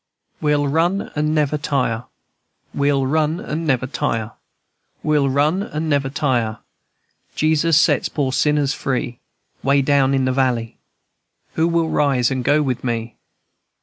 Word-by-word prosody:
"We'll 150 Hz, -1 st, +1 dB
run 170 Hz, +7 st, 0 dB
and 150 Hz, +1 st, 0 dB
never 150 Hz, 0 st, +1 dB
tire, 130 Hz, -5 st, -1 dB, 0.7 s
We'll 140 Hz, -1 st, +1 dB
run 155 Hz, +4 st, 0 dB
and 160 Hz, -1 st, -4 dB
never 130 Hz, -3 st, +1 dB
tire, 115 Hz, -4 st, -2 dB, 0.7 s
We'll 150 Hz, -2 st, +2 dB
run 150 Hz, +7 st, +1 dB
and 155 Hz, -5 st, -3 dB
never 140 Hz, -2 st, +1 dB
tire, 125 Hz, -6 st, -1 dB, 0.8 s
Jesus 155 Hz, 0 st, +3 dB
set -, -, +2 dB
poor 140 Hz, -3 st, -1 dB
sinners 145 Hz, 0 st, +1 dB
free. 130 Hz, -3 st, -3 dB, 0.4 s
Way 140 Hz, +1 st, +2 dB
down 140 Hz, -1 st, +3 dB
in 135 Hz, -1 st, +1 dB
de 130 Hz, -, +1 dB
valley, 125 Hz, -3 st, 0 dB, 0.8 s
Who 160 Hz, +1 st, +1 dB
will 165 Hz, -1 st, +1 dB
rise 135 Hz, -5 st, +2 dB
and 130 Hz, -1 st, -2 dB
go 145 Hz, +4 st, +3 dB
with 130 Hz, -3 st, -2 dB
me? 115 Hz, -2 st, -3 dB
140 Hz, 140 wpm, -20 LUFS, 130-150 Hz, 0.8 s, Jesus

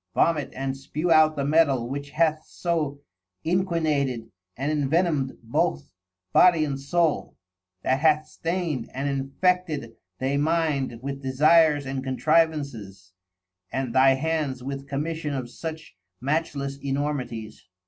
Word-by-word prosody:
Vomit 155 Hz, -4 st, +2 dB
and 135 Hz, 0 st, -3 dB
spew 150 Hz, +5 st, -3 dB
out 155 Hz, -1 st, +6 dB
the 140 Hz, -, -1 dB
Mettal 140 Hz, -5 st, +3 dB
which 140 Hz, +2 st, -5 dB
hath 155 Hz, 0 st, +1 dB
so 155 Hz, -5 st, -2 dB, 0.4 s
inqinated 155 Hz, -9 st, 0 dB, 0.3 s
and 140 Hz, +4 st, -1 dB
invenom'd 150 Hz, -1 st, +1 dB
both 70 Hz, -11 st, -1 dB, 0.4 s
Body 170 Hz, -4 st, +6 dB
and 140 Hz, -2 st, -3 dB
Soul, 160 Hz, +3 st, 0 dB, 0.5 s
that 130 Hz, +1 st, +2 dB
hath 155 Hz, 0 st, +3 dB
stain'd 165 Hz, -9 st, -3 dB
and 135 Hz, +2 st, -2 dB
infected 140 Hz, 0 st, 0 dB, 0.3 s
they 135 Hz, +2 st, 0 dB
mind 145 Hz, -6 st, 0 dB
with 140 Hz, 0 st, -4 dB
desires 150 Hz, +2 st, +4 dB
and 135 Hz, 0 st, -3 dB
contrivances, 130 Hz, -, 0 dB, 0.6 s
and 130 Hz, -3 st, -2 dB
thy 135 Hz, 0 st, +6 dB
hands 145 Hz, -3 st, -2 dB
with 135 Hz, +1 st, -5 dB
Commission 150 Hz, +1 st, -2 dB
of 125 Hz, -3 st, -5 dB
such 160 Hz, -, -7 dB, 0.2 s
matchless 140 Hz, -1 st, -2 dB
Enormities. 135 Hz, -6 st, -3 dB
140 Hz, 120 wpm, -25 LUFS, 135-160 Hz, 0.6 s, out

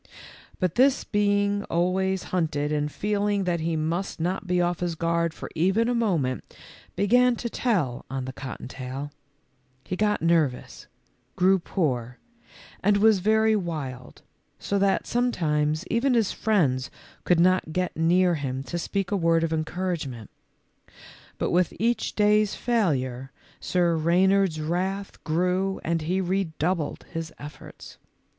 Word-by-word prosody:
But 180 Hz, -3 st, 0 dB
this 270 Hz, 0 st, +4 dB
being 205 Hz, 0 st, +1 dB
always 185 Hz, +2 st, 0 dB
hunted 150 Hz, -4 st, 0 dB
and 150 Hz, 0 st, -1 dB
feeling 205 Hz, +1 st, 0 dB
that 175 Hz, -2 st, 0 dB
he 165 Hz, +1 st, -1 dB
must 165 Hz, +5 st, -2 dB
not 180 Hz, +4 st, -2 dB
be 180 Hz, 0 st, +1 dB
off 175 Hz, 0 st, 0 dB
his 175 Hz, -2 st, -2 dB
guard 170 Hz, 0 st, 0 dB
for -, -, -8 dB
even 190 Hz, +8 st, +2 dB
a 245 Hz, -, +1 dB
moment, 170 Hz, -, -1 dB, 0.4 s
began 245 Hz, +4 st, +4 dB
to 235 Hz, 0 st, -5 dB
tell 175 Hz, -, 0 dB
on 135 Hz, -1 st, -3 dB
the 130 Hz, -, -6 dB
cotton 130 Hz, -3 st, -7 dB
taiL 130 Hz, +2 st, -6 dB, 0.7 s
He 185 Hz, -, -4 dB
got 210 Hz, +2 st, +1 dB
nervous, 160 Hz, -7 st, 0 dB, 0.5 s
grew 190 Hz, +1 st, +4 dB
poor, 125 Hz, -, -2 dB, 0.6 s
and 205 Hz, +1 st, +3 dB
was 215 Hz, -1 st, +5 dB
very 220 Hz, +2 st, +3 dB
wild, 145 Hz, -10 st, -5 dB, 0.3 s
so 200 Hz, -, -1 dB
that 195 Hz, 0 st, +2 dB
some 245 Hz, +1 st, +1 dB
times 150 Hz, -2 st, 0 dB
even 250 Hz, +2 st, +1 dB
his 225 Hz, -4 st, +2 dB
friends 145 Hz, -13 st, +1 dB, 0.3 s
could 175 Hz, -2 st, +3 dB
not 185 Hz, -2 st, +3 dB
get 180 Hz, +2 st, -2 dB
near 175 Hz, +2 st, +3 dB
him 135 Hz, -4 st, -3 dB
to 175 Hz, +5 st, -4 dB
speak 195 Hz, +3 st, -2 dB
a -, -, +2 dB
word 165 Hz, -3 st, +2 dB
of 165 Hz, -1 st, 0 dB
encouragement. 155 Hz, -, -3 dB, 1.1 s
But -, -, -1 dB
w 180 Hz, +1 st, +4 dB
T -, -, -13 dB
ith -, -, -16 dB
each 235 Hz, +2 st, 0 dB
day's 210 Hz, 0 st, +3 dB
failure, 135 Hz, -, -1 dB, 0.3 s
Sir 175 Hz, -2 st, +1 dB
Reynard's 180 Hz, +1 st, +2 dB
wrath 185 Hz, +5 st, -3 dB
grew 180 Hz, +4 st, 0 dB
and 165 Hz, 0 st, 0 dB
he 180 Hz, +5 st, -1 dB
redoubled 180 Hz, -3 st, -1 dB
his 165 Hz, 0 st, -5 dB
efforts. 145 Hz, +1 st, -11 dB
175 Hz, 145 wpm, -25 LUFS, 155-200 Hz, 1.1 s, was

